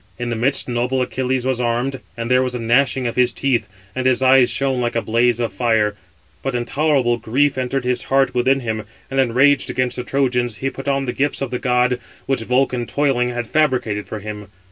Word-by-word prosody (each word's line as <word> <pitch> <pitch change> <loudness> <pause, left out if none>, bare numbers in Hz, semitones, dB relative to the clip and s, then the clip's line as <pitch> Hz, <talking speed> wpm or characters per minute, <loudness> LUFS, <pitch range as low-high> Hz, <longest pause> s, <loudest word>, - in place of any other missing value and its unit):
In 120 -1 -3
the - - -1
midst 130 +5 0
noble 125 +1 0
Achilles 130 0 -2
was 130 -2 0
armed, 120 +3 -1 0.2
and 115 +1 -3
there 125 0 +5
was 125 -1 -2
a - - -3
gnashing 125 +3 +2
of 120 - -2
his 125 -1 +3
teeth, 130 -3 -1 0.2
and 130 +2 -1
his 130 0 +2
eyes 130 -1 +6
shone 135 -2 0
like 120 -1 -1
a 115 - +1
blaze 120 +1 +2
of 115 -3 -2
fire; 110 -1 +1 0.5
but 135 -2 -3
intolerable 130 0 +1
grief 130 +6 +1
entered 130 +1 -2
his 125 0 -1
heart 135 -1 +2
within 130 +2 +2
him, 110 -2 -3 0.3
and, 135 - 0
enraged 135 +3 +3
against 125 0 -1
the 125 - -3
Trojans, 125 -4 0
he 135 +4 -2
put 135 +2 -9
on 135 -1 +1
the 125 - -2
gifts 145 +1 -1
of 135 -3 -3
the 125 - -2
god, 125 -1 +1 0.3
which 135 -3 0
Vulcan, 125 0 0
toiling, 135 -4 +1
had 120 -1 -3
fabricated 125 -8 0
for 110 - -5
him. 105 0 -7
125 Hz, 210 wpm, -20 LUFS, 120-135 Hz, 0.5 s, eyes